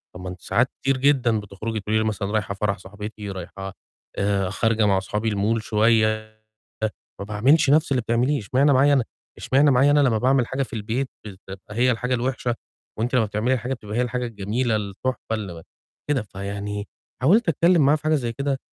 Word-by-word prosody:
طب 90 - -8
ما 90 - -5
أنتِ 90 0 -9
ساعات 115 +7 +1
كتير 135 0 +1
جدًا 130 -5 +3
بتخرجي 105 +2 -5
تقولي 105 +2 0
لي - - +1
مثلًا 105 -2 -2
رايحة 105 -2 -1
فرح 100 0 -1
صاحبتي، 105 +1 -8
رايحة 95 +1 -7 0.4
آآ 100 -2 +1
خارجة 110 +2 +1
مع 100 -2 +3
أصحابي 105 +3 -2
الmall 105 +3 +1
شوية 110 0 +1 0.8
ما - - -3
باعملش 135 +8 +3
نفس 155 -1 +3
اللي 130 - +2
بتعمليه، 125 +6 +1
اشمعنى 135 +8 +2
معايا 140 +2 +5
أنا 130 -4 +3 0.3
اشمعنى 140 +2 +3
معايا 135 +3 +4
أنا 145 - +5
لمّا 125 -6 +3
باعمل 130 0 +2
حاجة 135 +1 -2
في 125 - -6
البيت 115 +5 -2 0.2
بتبقى 95 -1 -10
هي 125 +1 +4
الحاجة 125 +2 0
الوحشة، 120 -1 -1 0.4
وأنتِ 120 +3 -1
لمّا 120 -3 +4
بتعملي 110 +6 0
حاجة 125 +4 -3
بتبقى 105 -2 -7
هي 125 - +3
الحاجة، 125 0 -2
الجميلة، 110 +2 -1
التحفة 110 +3 -3
اللي 100 -5 -4
م 80 - -10 0.5
كده." 135 -4 +2
فيعني 100 0 -5 0.3
حاولت 190 - +4
أتكلم 165 -1 +4
معاها 150 +2 +5
في 150 - -12
حاجة 155 0 +3
زي 120 -5 -1
كده، 140 +2 -2
115 Hz, 190 wpm, -23 LUFS, 105-130 Hz, 0.8 s, معايا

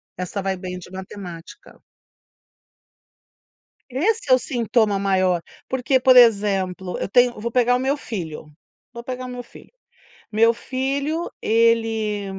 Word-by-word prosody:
Essa 180 +3 -4
vai 195 0 -1
bem 180 0 -6
de 180 0 -12
matemática. 185 -3 -10 2.1
Esse 330 - -1
é - - +9
o 255 - +5
sintoma 230 -5 0
maior, 185 -3 +1 0.3
porque, 260 +1 +1
por 255 0 +5
exemplo, 195 -6 +3
eu - - -2
tenho 245 0 +3
vou 235 +2 -4
pegar 245 0 +3
o 250 - 0
meu 270 +3 0
filho, 165 - -6 0.4
vou 235 0 -8
pegar 255 0 -5
o - - -6
meu 245 -1 -7
filho. - - -16 0.6
Meu 225 +2 +4
filho, 275 +7 -3
ele 225 -2 +1
230 Hz, 135 wpm, -22 LUFS, 190-255 Hz, 2.1 s, é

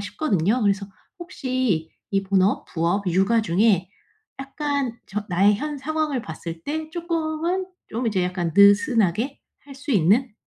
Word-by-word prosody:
싶거든요. 205 - 0
그래서 200 -1 +1 0.3
혹시 255 - -2 0.2
이 195 0 +2
본업, 195 0 +1
부업, 175 +4 -1
육아 195 +6 +3
중에 190 -1 +2 0.5
약간 275 -3 -3
전 210 +1 -4
나의 195 +3 +3
현 300 +4 -4
상황을 305 -3 -2
봤을 165 +1 -7
때 310 +1 -4
쪼끔은 335 +2 -2 0.2
좀 235 +2 -3
이제 195 -4 +1
약간 180 -2 -2
느슨하게 215 - +4 0.2
할 280 -1 -13
수 285 +2 -7
있는 215 +6 +3
220 Hz, 265 characters per minute, -23 LUFS, 190-285 Hz, 0.5 s, 느슨하게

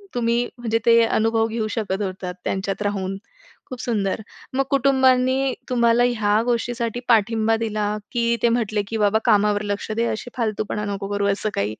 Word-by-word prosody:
तुम्ही 235 0 +1
म्हणजे 230 -2 -1
ते 230 0 +6
अनुभव 225 0 +1
घेऊ 225 -1 -2
शकत 200 -2 -2
होतात 185 -1 -4
त्यांच्यात 195 +1 -2
राहून. 195 -2 -2 0.5
खूप 255 -1 -6
सुंदर. 210 -4 -1 0.3
मग 270 +1 +2
कुटुंबांनी 265 -1 +3 0.2
तुम्हाला 235 -1 +3
ह्या 215 -3 +1
गोष्टीसाठी 240 -1 -1
पाठिंबा 225 0 +3
दिला 215 -2 -1 0.2
की 235 -1 +1
ते 235 - +5
म्हटले, 220 -3 0
की 225 - -3
"बाबा, 210 0 +3
कामावर 205 0 +3
लक्ष 205 - -6
द्या 230 +2 0
अशी 220 - -5
फालतूपणा 215 -2 -2
नको 195 0 -5
करू," 200 0 0
असं 215 +2 -2
काही. 105 +2 -2
225 Hz, 165 wpm, -22 LUFS, 205-235 Hz, 0.5 s, ते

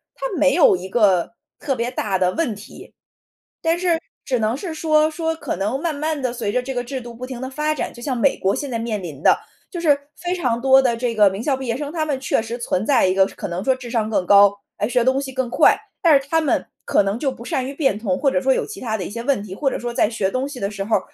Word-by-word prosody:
它 - - -5
没 280 -2 +4
有 310 - +6
一 185 +1 -6
个 195 -5 +2 0.3
特 270 - -1
别 240 +1 -2
大 205 -6 -1
的 180 -1 +2
问 280 -10 -1
题。 210 +2 -13 0.7
但 330 +1 +2
是 350 -2 +1 0.3
只 255 -3 0
能 220 +3 0
是 335 +1 -5
说， 310 -1 +2
说 325 0 -2
可 290 -4 -4
能 210 +8 -1
慢 330 -1 -1
慢 305 +1 -2
地 250 -2 -1
随 235 -4 -2
着 250 +3 0
这 265 +1 -4
个 245 -1 -2
制 260 +2 -5
度 240 0 -9
不 250 +2 -6
停 255 -2 -7
地 260 - -3
发 300 +3 -1
展， - - -4
就 240 - -12
像 255 0 -2
美 265 +4 +2
国 195 +1 +1
现 285 -2 -4
在 230 - -2
面 225 -3 -3
临 150 -5 -8
的， - - +6 0.3
就 350 - -6
是 310 -4 +4 0.2
非 355 0 -2
常 250 -10 0
多 265 +1 +6
的 240 -3 +1
这 240 0 -1
个 210 -2 +6
名 195 +4 -5
校 280 0 +1
毕 260 -1 -6
业 230 0 -1
生， 290 0 -5
他 320 -1 -1
们 285 -3 -2
确 265 - 0
实 230 +1 -5
存 210 -5 -1
在 265 -5 +4
一 185 - +2
个 190 0 +5
可 - - -7
能 175 +2 -4
说 265 +2 +2
智 255 -2 -9
商 220 -3 0
更 200 -4 0
高， 200 +1 +6 0.2
哎， 205 - 0
学 245 -1 +2
东 260 +2 +2
西 270 -1 -5
更 260 -1 -2
快， - - +5 0.2
但 315 -5 +6
是 275 - -12
他 325 +2 +2
们 310 - 0 0.2
可 - - +3
能 200 +3 -2
就 270 0 0
不 235 -2 -11
善 255 0 -1
于 275 - -5
变 270 -9 +1
通， 195 -5 -1
或 275 -1 +2
者 185 - +1
说 265 - +2
有 - - -1
其 - - -9
它 220 -3 -2
的 190 - -4
一 - - -6
些 230 +2 -5
问 255 -5 0
题。 195 -3 -8
或 270 +8 0
者 - - -3
说 240 0 -4
在 210 - +2
学 200 -4 -1
东 260 +4 -2
西 275 -3 -8
的 200 -1 -2
时 200 -1 -4
候， 215 +2 +2
250 Hz, 310 characters per minute, -21 LUFS, 215-280 Hz, 0.7 s, 有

